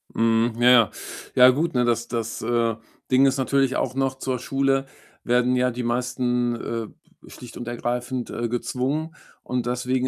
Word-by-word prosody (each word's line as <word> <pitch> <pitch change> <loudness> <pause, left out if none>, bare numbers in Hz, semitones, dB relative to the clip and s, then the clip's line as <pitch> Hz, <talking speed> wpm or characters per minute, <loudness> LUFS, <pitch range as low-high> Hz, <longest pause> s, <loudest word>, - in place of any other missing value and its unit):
Mhm. 115 0 +2
Ja, 120 +1 +5
ja. 115 -6 +5 0.4
Ja, 125 0 +8
gut, 150 +6 0
ne, 125 -1 +3
das 120 0 0
das, 115 -1 -4
äh, 115 -1 +1 0.4
Ding 130 +1 +5
ist 135 0 +2
natürlich 135 0 +1
auch 130 0 -1
noch, 135 -1 0
zur 130 -2 -3
Schule 135 +1 0 0.4
werden 125 +1 +2
ja 125 0 +2
die 125 +1 -5
meisten, 125 0 0
äh, 115 -1 -4 0.3
b - - -16
schlicht 125 -1 -11
und 120 - -7
ergreifend, 120 +1 -3
äh, 120 0 -3
gezwungen 130 +6 -2 0.3
und 125 -2 -2
deswegen 125 +1 -1
125 Hz, 175 wpm, -24 LUFS, 120-130 Hz, 0.4 s, Ja